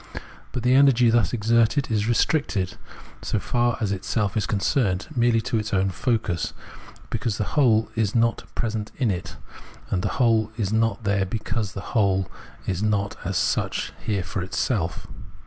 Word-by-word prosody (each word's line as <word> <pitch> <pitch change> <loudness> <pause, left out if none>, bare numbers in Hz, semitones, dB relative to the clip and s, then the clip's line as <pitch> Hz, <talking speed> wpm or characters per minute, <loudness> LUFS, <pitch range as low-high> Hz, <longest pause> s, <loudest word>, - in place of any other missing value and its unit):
But 125 - -4
the 125 +1 +4
energy 130 -4 +5
thus 115 -6 +3
exerted 115 +3 +2
is 105 -1 +1
restricted, 115 - +1 0.5
so - - -1
far 120 -1 0
as 105 -3 -1
itself 100 +1 -1
is 110 - 0
concerned, 100 -2 +1
merely 120 -2 +3
to 110 0 -1
its 105 0 -2
own 95 0 +2
focus, 110 -6 -1 0.6
because 115 -2 -1
the - - 0
whole 115 -7 +4
is 110 -2 0
not 115 0 +2
present 110 -2 -2
in 125 -6 +1
it; 90 -1 -5 0.5
and 90 - +1
the - - -2
whole 115 -4 +3
is 105 -3 -1
not 115 0 +1
there 100 -2 +1
because 110 0 -3
the 100 - -7
whole 95 -4 +2 0.3
is 95 0 -2
not 105 -2 0
as 95 0 -1
such - - 0
here 100 -4 -1
for 90 +2 -4
itself. 90 -2 -2
110 Hz, 165 wpm, -24 LUFS, 100-115 Hz, 0.6 s, energy